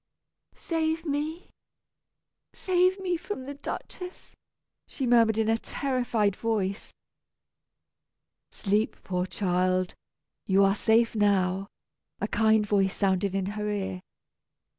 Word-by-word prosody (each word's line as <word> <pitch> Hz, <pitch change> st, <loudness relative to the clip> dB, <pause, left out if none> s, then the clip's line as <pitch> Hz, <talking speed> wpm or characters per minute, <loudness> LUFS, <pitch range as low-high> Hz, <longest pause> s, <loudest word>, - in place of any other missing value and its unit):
"Save 325 Hz, 0 st, -1 dB
me, 305 Hz, +3 st, -3 dB, 1.0 s
save 370 Hz, +1 st, +2 dB
me 360 Hz, -2 st, -1 dB
from 340 Hz, -4 st, -6 dB
the 285 Hz, -, -5 dB
Duchess!" 360 Hz, +5 st, -8 dB, 0.5 s
she 270 Hz, -, -4 dB
murmured 230 Hz, -3 st, +4 dB
in 220 Hz, -1 st, +1 dB
a 225 Hz, 0 st, +2 dB
terrified 245 Hz, -8 st, 0 dB
voice. 210 Hz, -3 st, -2 dB, 1.6 s
"Sleep, 210 Hz, +2 st, 0 dB
poor 180 Hz, 0 st, -2 dB
child, 185 Hz, -1 st, 0 dB, 0.5 s
you 195 Hz, 0 st, +4 dB
are 195 Hz, 0 st, +4 dB
safe 225 Hz, +2 st, +3 dB
now," 195 Hz, -2 st, +2 dB, 0.5 s
a -, -, -1 dB
kind 220 Hz, -1 st, +3 dB
voice 195 Hz, -2 st, +1 dB
sounded 195 Hz, -1 st, +1 dB
in 195 Hz, -1 st, 0 dB
her 210 Hz, +1 st, -3 dB
ear. 190 Hz, -3 st, -3 dB
215 Hz, 110 wpm, -27 LUFS, 195-280 Hz, 1.6 s, murmured